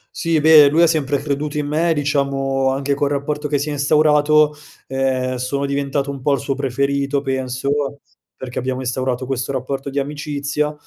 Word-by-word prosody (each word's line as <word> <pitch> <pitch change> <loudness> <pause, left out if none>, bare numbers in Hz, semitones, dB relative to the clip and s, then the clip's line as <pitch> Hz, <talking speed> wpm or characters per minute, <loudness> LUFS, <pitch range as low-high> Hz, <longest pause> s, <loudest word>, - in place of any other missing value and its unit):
Sì, 165 -1 +1
beh, 150 -1 +7
lui 160 +4 +3
ha 170 - +6
sempre 145 -3 0
creduto 145 +1 -3
in 150 - -1
me, 160 +3 +1
diciamo 140 -2 0
anche 140 +1 -1
col 145 0 0
rapporto 145 +1 -2
che 145 - 0
si 145 +2 -3
è - - -2
instaurato, 150 +1 +3 0.3
ehm, 130 -1 -1
sono 140 +3 -2
diventato 140 0 -1
un 135 - -8
po' 140 +2 +2
il 140 - 0
suo 140 0 -2
preferito, 140 +1 -1
penso, 130 0 -2 0.6
perché 130 -1 -6
abbiamo 130 +1 -3
instaurato 130 0 -2
questo 130 0 -3
rapporto 135 +1 -3
di 140 - -7
amicizia, 145 +1 -2
140 Hz, 175 wpm, -19 LUFS, 135-150 Hz, 0.6 s, beh